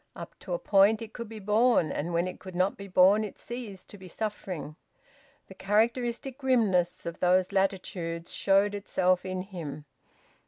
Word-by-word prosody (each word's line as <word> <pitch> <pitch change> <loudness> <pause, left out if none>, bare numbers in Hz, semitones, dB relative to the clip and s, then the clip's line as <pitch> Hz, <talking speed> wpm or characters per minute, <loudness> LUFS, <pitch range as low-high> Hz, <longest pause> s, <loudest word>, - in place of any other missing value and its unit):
Up - - -8
to - - -6
a - - -1
point 205 - +4
it 225 - -10
could 235 -3 -7
be 225 - -8
borne, 210 -3 +2
and 165 +4 -3
when 170 +1 +1
it 185 - -7
could 185 -1 -10
not 185 +2 +1
be 200 - -9
borne 190 +3 +5
it 210 - -7
ceased 225 -6 -8
to 205 - -11
be 185 - -11
suffering. 185 -6 -5 0.7
The - - -13
characteristic 235 +6 0
grimness 215 -10 +1
of 170 - -5
those 180 +1 +3
latitudes 180 -3 -2
showed 200 +1 +3
itself 185 -2 0
in 185 0 -3
him. 155 -7 -7
195 Hz, 170 wpm, -28 LUFS, 180-215 Hz, 0.7 s, borne